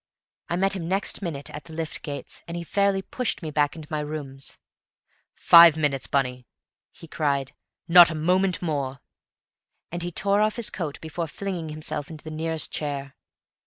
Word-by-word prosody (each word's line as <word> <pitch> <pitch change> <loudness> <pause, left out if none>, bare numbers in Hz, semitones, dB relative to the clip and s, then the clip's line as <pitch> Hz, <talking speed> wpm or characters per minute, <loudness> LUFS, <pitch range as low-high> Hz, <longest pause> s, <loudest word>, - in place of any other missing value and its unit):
I 175 - 0
met 195 +2 +1
him 170 -3 -4
next 195 +3 -1
minute 155 -7 -4
at 150 -1 -8
the 160 - -12
lift 160 0 -4
gates, 145 -2 -6
and 170 0 -5
he 170 - -4
fairly 200 +2 +1
pushed 250 -5 -2
me 155 - -4
back 145 0 +1
into 155 -2 -9
my 155 - -1
rooms. 145 -3 -6 0.8
"Five 170 -2 +8
minutes, 140 -4 0
Bunny!" 125 -3 -1 0.4
he 165 - -14
cried. 140 -4 -1 0.3
"Not 175 0 +9
a 160 - -4
moment 180 +4 +1
more." 140 -5 -2 0.9
And 175 +1 -4
he 175 +1 -3
tore 200 +3 +2
off 215 0 +2
his 235 -3 -1
coat 160 -7 -4
before 160 +1 -4
flinging 175 -1 -5
himself 155 -1 -5
into 155 -2 -9
the 155 - -7
nearest 160 0 -1
chair. 140 -2 -3
160 Hz, 175 wpm, -25 LUFS, 145-175 Hz, 0.9 s, Not